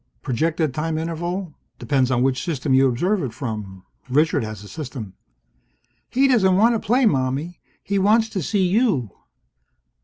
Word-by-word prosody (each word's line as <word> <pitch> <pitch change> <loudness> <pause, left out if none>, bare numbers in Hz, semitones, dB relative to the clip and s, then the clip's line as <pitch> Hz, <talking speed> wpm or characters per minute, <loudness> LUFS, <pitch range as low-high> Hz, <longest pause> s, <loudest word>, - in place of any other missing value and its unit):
Projected 155 +3 0
time 155 +1 -2
interval? 170 +2 -4 0.2
Depends 135 -3 +1
on 125 -1 +1
which 130 -1 0
system 145 -5 -1
you 135 +1 +5
observe 180 - 0
it 125 -7 -4
from. 105 -7 -6 0.3
Richard 150 +1 +2
has 110 -2 -7
a - - -11
system. 125 - -7 1.0
"He 270 +2 +3
doesn't 195 -8 +4
want 230 +4 +4
to 225 - 0
play, 245 +5 +2
Mommie. 140 - 0 0.2
He 200 0 0
wants 220 +3 +3
to 195 -4 -3
see 190 +3 +1
you!" 180 - +1
155 Hz, 155 wpm, -22 LUFS, 130-195 Hz, 1.0 s, you